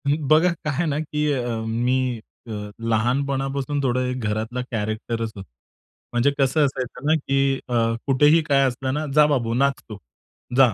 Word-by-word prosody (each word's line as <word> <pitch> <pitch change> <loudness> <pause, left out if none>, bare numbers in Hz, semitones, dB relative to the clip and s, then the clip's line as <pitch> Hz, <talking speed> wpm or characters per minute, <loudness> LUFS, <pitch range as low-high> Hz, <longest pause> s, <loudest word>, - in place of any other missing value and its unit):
ही, 145 +1 +3
बघा 160 +4 +5
काय 155 -2 -4
आहे 170 +6 0
ना, 150 -2 -1
की 150 -1 -1
अ, 125 -3 -2 0.2
मी 125 +1 0 0.3
अ - - -7 0.4
लहानपणापासून 135 +4 0
थोडं 125 0 0
घरातला 110 +3 -2
कॅरेक्टरचं 110 +1 -3
होतो. 95 - -10 0.7
म्हणजे 120 +4 +3
कसं 140 +2 +3
असायचं 130 -1 -4
ना, 155 - +5
की 135 -2 +1
अ, - - -3 0.3
कुठेही 145 +4 +5
काय 140 -2 +3
असलं 130 +1 -3
ना, 150 +2 -2
"जा 150 -1 +7
बाबू 120 -6 0
नाच 140 +3 +3 0.2
तू. 105 - -7 0.6
जा 130 -5 +6
135 Hz, 160 wpm, -23 LUFS, 120-145 Hz, 0.7 s, जा